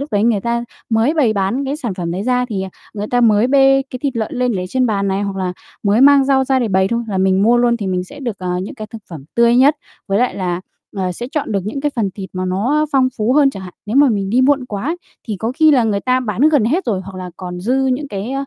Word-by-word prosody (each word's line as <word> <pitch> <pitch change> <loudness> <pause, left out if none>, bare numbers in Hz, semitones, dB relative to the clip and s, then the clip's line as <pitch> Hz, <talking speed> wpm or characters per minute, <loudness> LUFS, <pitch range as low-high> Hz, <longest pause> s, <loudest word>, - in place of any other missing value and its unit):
lúc 280 -3 -6
đấy 205 - +2
người 225 -4 +2
ta 235 +2 -1 0.3
mới 225 +8 +2
bày 255 -9 +3
bán 205 +7 -1
cái 275 +2 -2
sản 240 -10 -4
phẩm 175 -3 -4
đấy 180 +3 -3
ra, 250 +2 +1
thì 195 -3 -3 0.3
người 210 0 -4
ta 245 - +2
mới 220 -1 +4
bê 270 0 +4
cái 255 - -5
thịt 275 -4 -1
lợn 220 -2 -2
lên 250 -1 +1
lấy 185 -3 -3
trên 255 +4 +1
bàn 200 -3 0
này, 195 +1 -1
hoặc 200 -1 -3
là 185 -1 -2 0.3
mới 210 +2 +2
mang 280 0 +6
rau 265 -1 +2
ra 265 0 +2
để 240 -3 0
bày 190 -1 +2
thôi 235 +2 -1
là 195 -3 -2
mình 190 0 +2
mua 235 +3 +4
luôn, 240 0 +3
thì 210 -4 -5
mình 180 -1 -1
sẽ 285 +9 -12
được, 235 -7 -4
ờ, 180 -1 -2
những 205 - -7
cái 215 -4 -7
thực 220 0 -11
phẩm 155 -6 -9
tươi 235 0 +4
nhất, 280 +4 +5 0.3
với 195 - +1
lại 250 +1 +1
là, 180 -2 -2 0.4
ờ, 185 -2 -1
sẽ 240 +7 -6
chọn 300 -7 -2
được 200 - +1
những 225 +7 -4
cái 295 +1 0
phần 210 -4 0
thịt 190 -2 -8
mà 185 0 -3
nó 245 +12 0
phong 260 -2 +3
phú 220 +3 +1
hơn 280 0 +4
chẳng 195 -6 -9
hạn. 180 -1 -10
Nếu 220 - -2
mà 285 -1 +6
mình 200 -3 -1
đi 245 +4 +3
muộn 270 0 +3
quá 250 - -3 0.3
thì 210 - -2
có 225 +4 -2
khi 315 0 +5
là 255 -5 +4
người 205 -3 0
ta 255 +2 +1
bán 220 -2 -3
gần 295 -8 +3
hết 315 +12 0
rồi 200 -5 0
hoặc 195 -1 -9
là 180 -1 -6
còn 180 -1 -7
dư 235 +8 0
những 265 +3 -1
cái 205 +4 -5
225 Hz, 290 wpm, -17 LUFS, 195-260 Hz, 0.4 s, mang